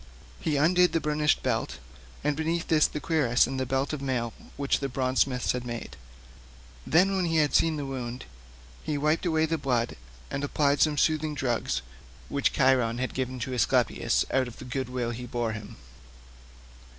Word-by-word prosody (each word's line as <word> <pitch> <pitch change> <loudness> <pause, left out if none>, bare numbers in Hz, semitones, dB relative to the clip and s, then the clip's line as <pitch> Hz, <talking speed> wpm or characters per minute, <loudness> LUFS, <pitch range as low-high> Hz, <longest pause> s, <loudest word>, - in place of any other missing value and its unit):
He 150 -2 0
undid 180 +4 +4
the 165 - +2
burnished 150 -1 +1
belt, - - -1 0.5
and 150 0 +1
beneath 160 +2 -2
this 155 -2 +5
the 150 - -5
cuirass 145 -6 +3
and 130 +1 -4
the 130 - -1
belt 135 +3 0
of 150 - -4
mail 125 -4 -1 0.2
which 140 -1 +1
the 140 - -2
bronze 130 0 0
smiths 125 -3 +1
had 125 -1 -3
made; 120 -1 -6 0.9
then, 190 +5 +4
when 185 -2 +1
he 165 -1 0
had 150 -2 +2
seen 165 -1 +3
the 145 - -3
wound, 125 -2 -5 0.6
he 150 -2 -2
wiped 155 +5 +1
away 160 -1 +2
the 165 0 -1
blood 125 -4 0 0.4
and 140 - -3
applied 145 0 +1
some 150 -2 +3
soothing 155 0 +1
drugs 125 - -1 0.5
which 140 -1 +1
Chiron 130 -4 +3
had 130 +1 -2
given 130 -1 -3
to 130 +3 -3
Aesculapius 125 - +2
out 130 -1 +2
of 120 - -10
the - - -9
good 130 0 -3
will 125 -2 -2
he 125 +1 -6
bore 120 -1 -1
him. 105 -1 -8
135 Hz, 185 wpm, -27 LUFS, 125-155 Hz, 0.9 s, this